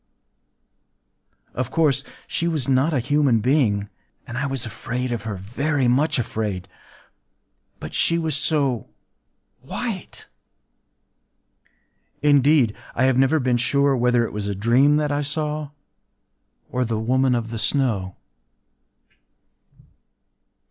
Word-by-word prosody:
Of 130 0 -3
course, 145 -4 +2 0.2
she 170 - -2
was 155 -7 -1
not 135 +4 +2
a 145 - +1
human 140 -2 +2
being; 110 -5 +1 0.4
and 120 - -8
I 140 +3 -1
was 135 -3 -2
afraid 125 +3 -4
of 115 -3 -4
her,—very 120 +8 -1
much 145 +5 +2
afraid,—but 100 - -8
she 170 - +2
was 160 -3 0
so 145 -5 +1 0.7
white!... - - -6 2.0
Indeed, 145 -5 +4 0.2
I 125 - +1
have 130 -1 +3
never 135 +4 +3
been 125 -2 +1
sure 140 +3 +2
whether 120 -1 +2
it - - -7
was 105 -1 -3
a 100 - -2
dream 125 +8 +3
that 150 -1 0
I 145 0 0
saw, 150 0 -3 1.0
or 125 - 0
the 115 -2 -2
Woman 130 +3 +2
of 115 -1 -3
the 115 - -4
Snow. 110 -10 0
130 Hz, 115 wpm, -22 LUFS, 115-145 Hz, 2.0 s, Indeed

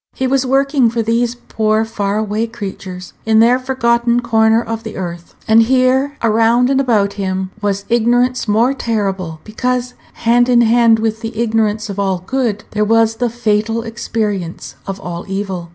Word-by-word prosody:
He 260 - -2
was 265 0 +1
working 270 -1 +2
for 230 0 -1
these 230 +2 0
poor 220 -2 -1
far 205 -2 -2
away 215 +1 -1
creatures, 190 -4 -8
in 220 0 +3
their 240 +3 +4
forgotten 240 -2 +1
corner 225 -1 +3
of 225 -1 -4
the - - -8
earth; 175 -2 -7
and 220 +1 +6
here, 260 +3 +2
around 230 +3 +3
and 270 0 +2
about 210 -6 +1
him, 190 -1 -3
was 200 -1 -2
ignorance 245 +2 +1
more 225 +5 +2
terrible, 195 - -3
because, 250 +3 -2 0.2
hand 240 +2 +2
in 240 -1 +5
hand 230 0 +4
with 220 0 -2
ignorance 220 -1 -1
of 200 -1 -6
all 190 -2 -1
good, 235 -4 -1
there 210 0 0
was 225 +1 +2
the 245 0 0
fatal 225 0 -1
experience 210 - -4
of 195 0 -5
all 175 -2 -6
evil. 195 -3 -4
225 Hz, 165 wpm, -16 LUFS, 205-240 Hz, 0.2 s, and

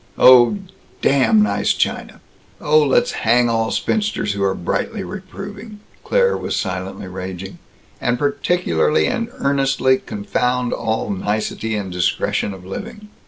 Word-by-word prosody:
'" - - -32
"Oh, 125 +8 +7 0.5
damn 115 -6 +4
nice 100 -1 +1
china! - - -2 0.4
Oh, 155 +1 +4
let's 140 -3 +2
hang 120 +1 +2
all 115 -1 0
spinsters 210 - -1
who 100 - -4
are 95 -1 +1
brightly 200 - -2
reproving," 205 +3 -8 0.2
Claire 485 -1 +2
was - - -3
silently 95 0 -4
raging. 95 0 -7 0.4
"And 125 0 +1
particularly 150 +3 +1
and 235 -2 -1
earnestly 135 - +1
confound 125 +4 -1
all 110 -1 -2
nicety 105 +2 -2
and 100 -3 -4
discretion 90 +3 0
of 95 -2 -10
living." 210 - -8
125 Hz, 130 wpm, -19 LUFS, -, 0.5 s, Oh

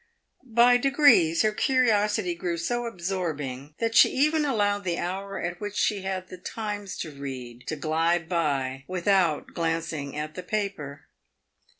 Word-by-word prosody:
By 240 +1 +5
degrees 255 - +4
her 215 - +3
curiosity 210 -6 +2
grew 170 0 -3
so 240 +8 -2
absorbing 155 - -4
that 230 -1 -1
she - - +7
even 305 +3 +2
allowed 205 -6 +1
the 175 -2 -1
hour 195 +3 -4
at 175 +2 -4
which 205 0 -5
she 205 -2 +1
had 190 -1 -4
the 185 - -10
Times 205 0 -5
to 160 - -5
read 130 -4 -8
to 155 - -2
glide 165 +2 0
by 140 -6 -1
without 185 -3 +2
even - - -20
glancing 165 -4 -2
at 150 0 -4
the 185 - -6
paper. 180 -8 -4
180 Hz, 155 wpm, -26 LUFS, 155-210 Hz, -, she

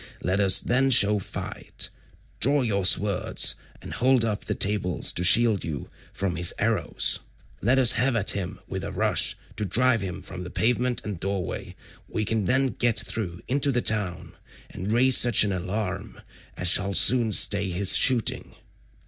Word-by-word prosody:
Let 95 +3 -1
us 95 -1 +5
then 130 +2 0
show 105 -4 +4
fight; 95 - -5 0.5
draw 140 +2 +2
your 100 -5 -1
swords, 100 +1 +1 0.3
and - - -9
hold 125 -1 +1
up 105 -2 -4
the - - -3
tables 100 -3 -1
to 90 - -1
shield 110 +2 +4
you 75 -5 -7 0.2
from 95 -3 -4
his 85 0 +2
arrows. 105 -6 0 0.4
Let 125 +6 +1
us 125 -3 +5
have 125 0 0
at 105 -3 +1
him 95 -3 -6
with - - -6
a - - -6
rush, - - 0 0.2
to - - -3
drive 115 +4 +1
him 95 -1 -6
from 90 -1 -7
the 90 - -9
pavement 125 +4 -1
and 100 -5 -6
doorway: 95 -1 -5 0.3
we 110 - -4
can 110 -1 -2
then 130 +5 +1
get 120 +1 -1
through 105 -5 -5
into 140 +2 -1
the 125 -2 -2
town, 100 -6 -2 0.4
and 95 +4 -6
raise 125 +2 +4
such 120 -4 +6
an 105 - -2
alarm 95 +2 -5 0.4
as 90 - -1
shall 95 +2 +2
soon 120 -3 +4
stay 100 -1 +4
his 90 +2 +3
shooting." 125 -4 +1
105 Hz, 170 wpm, -24 LUFS, 95-120 Hz, 0.5 s, such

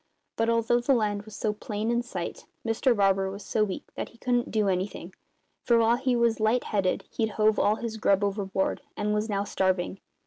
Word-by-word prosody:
But, 225 0 +1
although 230 +1 +3
the 260 +3 +2
land 210 -3 0
was 215 - -10
so 215 -2 -1
plain 210 +1 -3
in 235 0 +2
sight, 185 -8 -6 0.2
Mr 235 +2 +2
Barber 195 -1 +3
was 200 +1 -8
so 215 - +1
weak 195 -3 -3
that - - -5
he 235 - -20
couldn't 245 0 0
do 215 -2 +1
anything; 185 -1 -2 0.5
for 235 - +4
while 230 +1 +4
he 255 -1 +1
was 235 -1 +2
light 220 +3 +2
headed 195 -4 0
he'd 220 -2 0
hove 215 0 +3
all 210 - +3
his 225 -1 -5
grub 200 -2 +2
overboard 195 -1 -1 0.2
and 210 0 0
was 210 +1 -1
now 200 -1 0
starving. 185 -1 0
215 Hz, 205 wpm, -27 LUFS, 200-230 Hz, 0.5 s, for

